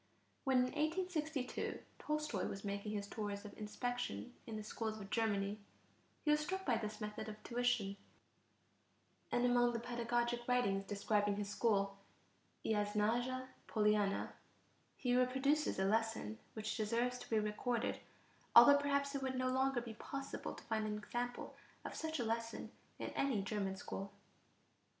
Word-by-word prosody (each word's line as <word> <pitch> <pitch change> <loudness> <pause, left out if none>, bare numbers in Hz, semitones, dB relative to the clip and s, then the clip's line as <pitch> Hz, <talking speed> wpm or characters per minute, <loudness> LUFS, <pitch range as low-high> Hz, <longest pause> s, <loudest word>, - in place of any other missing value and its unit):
When 265 -1 +4
in 250 - +6
1862 310 -1 -1 0.2
Tolstoy 300 -10 -1
was 195 - -5
making 200 +1 -2
his 200 -1 -2
tours 205 -1 -4
of 205 - -8
inspection 245 +3 -3
in 225 - -4
the 215 - -4
schools 220 0 -3
of 195 -1 -8
Germany, 205 -2 +1 0.7
he 300 - +5
was 300 - +5
struck 380 +5 -2
by 240 -4 +3
this 215 -1 -4
method 210 0 -4
of 215 0 -9
tuition, 240 -5 +1 1.3
and 245 - +3
among 245 0 +4
the 230 - 0
pedagogic 240 0 0
writings 200 -6 +2
describing 205 0 +1
his 205 0 -3
school, 200 -4 +2 0.7
Iasnaja 225 +5 +1 0.2
Poliana, 210 -2 +2 0.7
he 245 -1 +2
reproduces 265 +4 +3
a 190 - +2
lesson 220 - 0 0.2
which 215 -1 -2
deserves 235 +3 +1
to - - -10
be 225 - +3
recorded, 220 +3 0 0.6
although 285 0 +11
perhaps 280 0 +1
it 275 - -1
would 260 -1 -1
no 255 0 +1
longer 265 -1 +2
be 235 -1 -6
possible 275 +5 -5
to - - -11
find 220 -1 0
an 210 0 -1
example 240 +3 -3 0.3
of - - -4
such 320 0 -2
a 240 - 0
lesson 230 0 -2 0.3
in - - -3
any 255 -8 +1
German 195 -1 -1
school. 195 +1 -5
230 Hz, 150 wpm, -38 LUFS, 210-255 Hz, 1.3 s, although